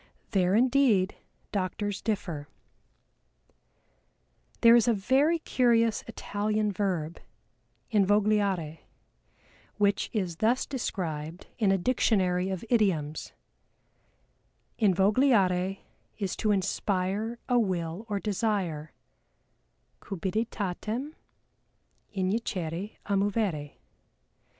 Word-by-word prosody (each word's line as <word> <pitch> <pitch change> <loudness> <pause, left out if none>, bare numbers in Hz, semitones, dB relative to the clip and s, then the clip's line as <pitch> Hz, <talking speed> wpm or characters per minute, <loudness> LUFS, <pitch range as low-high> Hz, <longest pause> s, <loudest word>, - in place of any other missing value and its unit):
There 185 -1 +2
indeed 240 -6 +3 0.4
doctors 200 +1 -2
differ. 175 -9 -3 2.1
There 230 0 +8
is 240 -1 +4
a 235 - +4
very 270 +11 +3
curious 230 -7 +2
Italian 210 -1 -1
verb, 180 -5 -2 0.7
Invogliare, 200 -5 +2 1.0
which 200 -1 +1
is 185 -7 -2
thus 230 +6 +2
described 170 - -4
in 205 -4 +3
a 195 - +3
Dictionary 190 -4 +1
of 190 +3 -4
Idioms: 180 -10 0 1.5
"Invogliare 195 -2 +3 0.4
is 195 -4 -2
to 215 - 0
inspire 200 +2 0
a 245 -1 +3
will 185 0 -2
or 205 -1 -1
desire, 195 -7 -2 1.1
cupiditatem 215 - -3 1.0
injicere 185 -2 -2
a 200 - -2
movere. 195 -7 -1
200 Hz, 80 wpm, -28 LUFS, 185-225 Hz, 2.1 s, There